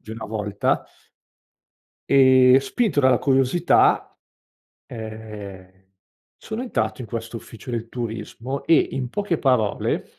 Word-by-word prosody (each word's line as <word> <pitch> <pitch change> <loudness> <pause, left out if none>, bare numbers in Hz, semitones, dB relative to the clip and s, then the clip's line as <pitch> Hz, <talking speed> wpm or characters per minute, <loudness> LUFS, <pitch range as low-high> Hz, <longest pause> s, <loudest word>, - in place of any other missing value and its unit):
di 110 - -12
una 110 0 -6
volta 105 -2 -1 1.3
e 130 -1 +6
spinto 190 - 0
dalla 130 -3 +4
curiosità, 135 +5 +2 0.7
ehm, 105 -4 -9 0.7
sono 220 +2 -6
entrato 240 - -2
in 120 - -8
questo 115 +1 -5
ufficio 115 +3 -12
del 115 -1 -3
turismo, 115 +3 -5
e 165 - +5 0.2
in 130 -2 -3
poche 200 -3 -2
parole 125 -6 0
120 Hz, 110 wpm, -22 LUFS, 110-135 Hz, 1.3 s, e